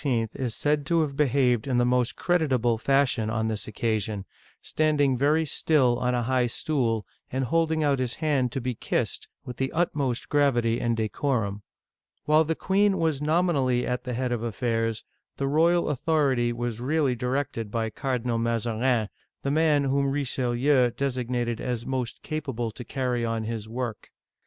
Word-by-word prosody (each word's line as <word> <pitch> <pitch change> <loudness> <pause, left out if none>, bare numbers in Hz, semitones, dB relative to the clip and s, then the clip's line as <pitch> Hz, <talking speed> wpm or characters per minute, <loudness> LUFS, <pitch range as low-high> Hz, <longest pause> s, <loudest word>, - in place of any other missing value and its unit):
is 125 -4 -3
said 150 0 +1
to 165 +3 +2
have 145 -3 -2
behaved 130 -4 +2
in 130 -2 +1
the 120 - +3
most 125 -1 +1
creditable 135 -10 +1
fashion 130 -4 +2
on 110 0 -1
this 110 -2 -3
occasion, 110 -2 -2 0.3
standing 150 -4 +1
very 150 +5 +2
still 135 -5 +2
on 125 0 +1
a 120 - 0
high 125 0 +1
stool, 115 -5 -1 0.3
and 130 +1 -1
holding 160 +2 +1
out 140 -2 +2
his 125 -2 -1
hand 140 -6 0
to 135 - -2
be 125 0 -2
kissed, - - -2 0.2
with 125 -2 -7
the 135 0 -1
utmost 145 -7 -1
gravity 120 -6 +2
and 115 -1 0
decorum. 110 -2 -1 0.6
While 155 +2 +4
the 160 +1 -1
queen 195 +2 +2
was 160 -4 0
nominally 150 -6 +2
at 125 0 -2
the 125 - -4
head 125 +1 -1
of 120 -2 -1
affairs, 115 -1 -1 0.3
the 135 - -1
royal 170 +4 +3
authority 140 -4 +1
was 120 -1 -3
really 140 0 +1
directed 125 -3 -2
by 110 0 -2
Cardinal 125 -1 -1
Mazarin, 115 0 0 0.4
the 140 - 0
man 150 -1 +3
whom 140 0 +1
Richelieu 130 -1 +2
designated 125 -2 -2
as 120 -2 -3
most 130 -3 -3
capable 135 -7 -3
to 125 - -9
carry 125 -2 -2
on 115 -1 -1
his 110 -1 -5
work. 120 -2 -5
125 Hz, 160 wpm, -26 LUFS, 115-145 Hz, 0.6 s, While